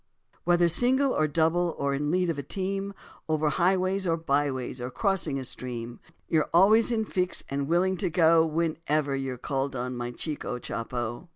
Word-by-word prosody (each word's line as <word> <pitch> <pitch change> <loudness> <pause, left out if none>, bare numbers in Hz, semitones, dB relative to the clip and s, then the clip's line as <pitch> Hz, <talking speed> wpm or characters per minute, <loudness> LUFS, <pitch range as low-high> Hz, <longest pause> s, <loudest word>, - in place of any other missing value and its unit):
Whether 175 0 +4
single 255 - +3
or 155 - +2
double 165 +3 +1
or 140 0 0
in 140 +2 -2
the - - 0
lead 180 +1 +1
of - - -4
the - - -2
team, 195 +6 -3 0.3
Over 155 -1 +1
highways 185 +4 +1
or 165 -1 +1
byways 140 -5 -1
or 125 - -3
crossing 165 0 0
a 135 - -4
stream, 120 -2 -5 0.3
You're 155 -2 +1
always 215 +7 +5
in 220 -2 0
fix 180 -3 -1
and 140 0 -2
willing 180 +3 +2
to 185 -2 0
go, 165 0 +5
Whenever 155 -3 -1
you're 135 -2 -3
called 135 +1 -2
on, 125 0 -3
my 120 0 -4
chico 135 0 -4
Chopo. 120 +4 -5
160 Hz, 180 wpm, -27 LUFS, 135-180 Hz, 0.3 s, always